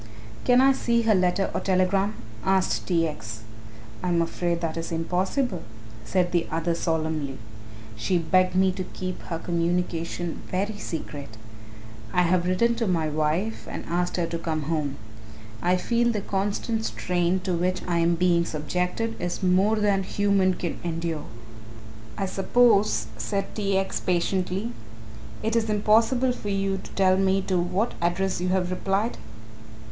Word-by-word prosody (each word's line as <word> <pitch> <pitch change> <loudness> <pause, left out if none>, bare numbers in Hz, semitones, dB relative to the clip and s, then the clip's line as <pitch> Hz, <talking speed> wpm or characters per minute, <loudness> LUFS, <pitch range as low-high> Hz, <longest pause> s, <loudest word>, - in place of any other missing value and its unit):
"Can 245 +1 +6
I 270 +1 +6
see 235 -3 +1
her 225 -1 +4
letter 185 0 +2
or - - 0
telegram?" 195 +2 +1 0.3
asked 190 -1 +1
T. 165 -3 +2
X. 110 -7 -7 0.6
"I - - -2
am 170 -1 +2
afraid 170 +1 0
that 165 -2 -2
is 165 0 -4
impossible," 180 - 0 0.4
said 175 +9 +1
the 170 -2 +1
other 165 +1 0
solemnly; 160 -5 -1 0.6
"she 110 +12 0
begged 185 +2 +2
me 190 0 +4
to 185 0 -4
keep 185 0 -6
her 165 - -3
communication 170 0 -2
very 205 +3 -2
secret. 145 - -6 0.7
I 180 - +3
have 175 0 +2
written 235 +6 +3
to 230 -2 0
my 165 -4 +1
wife 155 +8 -1
and - - -6
asked 175 +1 -1
her 175 - +1
to 170 0 -4
come 160 -2 -2
home. 150 -2 -1 0.7
I 180 +1 +3
feel 235 +5 +1
the 210 -3 -2
constant 205 +3 -1
strain 180 -2 0
to 185 -1 -1
which 180 +2 0
I 170 -1 +1
am 170 +1 +3
being 170 0 +3
subjected 180 +9 -2
is 175 +2 -3
more 190 +4 +4
than 205 -2 +2
human 195 -1 +2
can 175 - -4
endure." 165 -2 -3 0.9
"I 195 - 0
suppose," 200 - +3
said 155 - -2
T. 200 -2 0
X. 195 0 -1
patiently, 185 +4 0 0.7
"it 220 +1 0
is 225 -1 +1
impossible 225 +5 +3
for 210 -4 -5
you 195 -1 0
to - - -11
tell 190 -1 +4
me 195 0 +3
to 185 -2 +1
what 185 +6 0
address 180 +2 0
you 180 - 0
have 185 -1 +1
replied?" 195 +5 -1
185 Hz, 155 wpm, -26 LUFS, 170-200 Hz, 0.9 s, Can